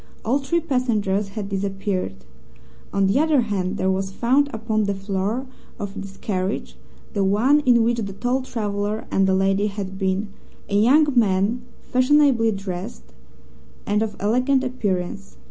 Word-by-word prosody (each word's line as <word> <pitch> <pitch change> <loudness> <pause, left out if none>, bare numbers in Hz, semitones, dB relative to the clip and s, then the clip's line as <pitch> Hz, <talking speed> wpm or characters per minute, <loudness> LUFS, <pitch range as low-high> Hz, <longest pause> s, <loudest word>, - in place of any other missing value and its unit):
All 255 +6 +2
three 285 +5 0
passengers 215 -9 0
had 205 -2 -3
disappeared. 195 - -3 0.7
On 195 - +2
the 195 +7 +3
other 310 -3 +3
hand, 200 -3 -2
there 190 0 +1
was 190 0 -1
found 260 +8 +2
upon 220 -1 -1
the 200 0 -1
floor 195 +5 -2 0.3
of 205 -3 -5
this 195 -1 -8
carriage 190 0 -3 0.4
the 200 -3 +1
one 225 +10 +4
in 235 -2 +6
which 235 +1 +1
the 200 -3 -4
tall 245 +6 -1
traveller 210 -3 -3
and 195 0 +3
the 190 - +3
lady 195 +2 +2
had 195 -2 -5
been 195 +1 0 0.4
a 200 - -2
young 255 +9 +5
man 210 +1 +2 0.2
fashionably 255 -3 +3
dressed 175 - -6 0.7
and 210 +1 +1
of 215 -2 -2
elegant 250 +6 +2
appearance. 200 -6 -3
205 Hz, 150 wpm, -22 LUFS, 195-245 Hz, 0.7 s, in